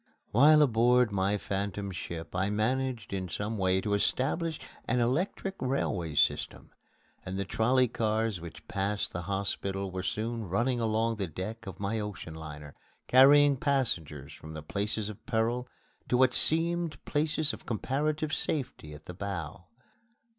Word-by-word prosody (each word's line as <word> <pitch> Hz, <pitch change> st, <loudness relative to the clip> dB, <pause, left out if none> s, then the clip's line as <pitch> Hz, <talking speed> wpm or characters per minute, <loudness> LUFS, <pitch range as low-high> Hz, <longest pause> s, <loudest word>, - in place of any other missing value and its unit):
While 150 Hz, +6 st, +7 dB
aboard 120 Hz, -1 st, +4 dB
my 100 Hz, +1 st, +1 dB
phantom 100 Hz, 0 st, -3 dB
ship 85 Hz, -2 st, -6 dB
I 95 Hz, +2 st, +1 dB
managed 120 Hz, +1 st, -1 dB
in 95 Hz, -2 st, -3 dB
some 105 Hz, +6 st, -3 dB
way 95 Hz, 0 st, +2 dB
to 105 Hz, 0 st, -1 dB
establish 150 Hz, -, 0 dB, 0.3 s
an 125 Hz, -, +1 dB
electric 165 Hz, +10 st, 0 dB
railway 100 Hz, -, -1 dB
system; -, -, +1 dB, 0.5 s
and 95 Hz, +1 st, -5 dB
the 100 Hz, -, -1 dB
trolley 125 Hz, +6 st, +3 dB
cars 110 Hz, -4 st, -1 dB
which 85 Hz, -1 st, -10 dB
passed 100 Hz, +1 st, -1 dB
the 85 Hz, -, -3 dB
hospital 95 Hz, +1 st, -2 dB
were 95 Hz, 0 st, -3 dB
soon 110 Hz, +4 st, -2 dB
running 120 Hz, +6 st, +1 dB
along 115 Hz, 0 st, +1 dB
the 100 Hz, -3 st, -2 dB
deck 95 Hz, +7 st, -6 dB
of 95 Hz, -, -7 dB
my 100 Hz, +3 st, -1 dB
ocean 105 Hz, -6 st, -6 dB
liner, 75 Hz, -2 st, -9 dB, 0.3 s
carrying 140 Hz, +2 st, +7 dB
passengers 100 Hz, -, -1 dB
from 80 Hz, 0 st, -10 dB
the 80 Hz, -, -6 dB
places 105 Hz, +5 st, -2 dB
of 105 Hz, -2 st, -8 dB
peril 120 Hz, +1 st, 0 dB, 0.4 s
to 125 Hz, -, +3 dB
what 130 Hz, 0 st, +5 dB
seemed 165 Hz, 0 st, +1 dB
places 155 Hz, 0 st, +1 dB
of -, -, -10 dB
comparative 150 Hz, +6 st, -1 dB
safety 130 Hz, -, -2 dB
at 75 Hz, -, -14 dB
the 90 Hz, -, -7 dB
bow. 95 Hz, -2 st, -5 dB
110 Hz, 150 wpm, -30 LUFS, 95-130 Hz, 0.5 s, While